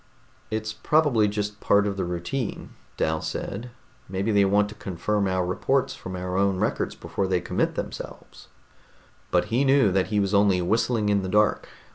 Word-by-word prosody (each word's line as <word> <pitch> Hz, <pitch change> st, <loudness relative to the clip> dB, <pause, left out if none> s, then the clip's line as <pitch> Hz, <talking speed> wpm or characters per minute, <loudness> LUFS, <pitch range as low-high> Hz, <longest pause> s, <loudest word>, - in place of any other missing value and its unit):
"It's 110 Hz, 0 st, -3 dB
probably 145 Hz, -9 st, +3 dB
just 105 Hz, 0 st, -3 dB
part 100 Hz, 0 st, +3 dB
of 100 Hz, -1 st, -1 dB
the 95 Hz, -, -2 dB
routine," 90 Hz, +8 st, -4 dB, 0.3 s
Dal -, -, 0 dB
said. 115 Hz, +6 st, -5 dB, 0.4 s
"Maybe 100 Hz, +3 st, -1 dB
they 100 Hz, -1 st, +4 dB
want 100 Hz, +1 st, +3 dB
to -, -, -8 dB
confirm 100 Hz, +1 st, -2 dB
our 95 Hz, -1 st, 0 dB
reports 130 Hz, +9 st, 0 dB
from 95 Hz, -, -7 dB
our 90 Hz, 0 st, -3 dB
own 100 Hz, -1 st, +2 dB
records -, -, -1 dB
before 95 Hz, -, -3 dB
they 95 Hz, -1 st, +1 dB
commit -, -, -1 dB
themselves." -, -, -7 dB, 0.8 s
But -, -, +2 dB
he 125 Hz, +4 st, +3 dB
knew 135 Hz, -6 st, +4 dB
that 95 Hz, 0 st, +1 dB
he 105 Hz, -1 st, 0 dB
was 100 Hz, 0 st, 0 dB
only 100 Hz, -2 st, +4 dB
whistling 110 Hz, +3 st, +1 dB
in 100 Hz, -1 st, +2 dB
the 95 Hz, -, -4 dB
dark. 105 Hz, +2 st, +2 dB
100 Hz, 175 wpm, -25 LUFS, 95-110 Hz, 0.8 s, they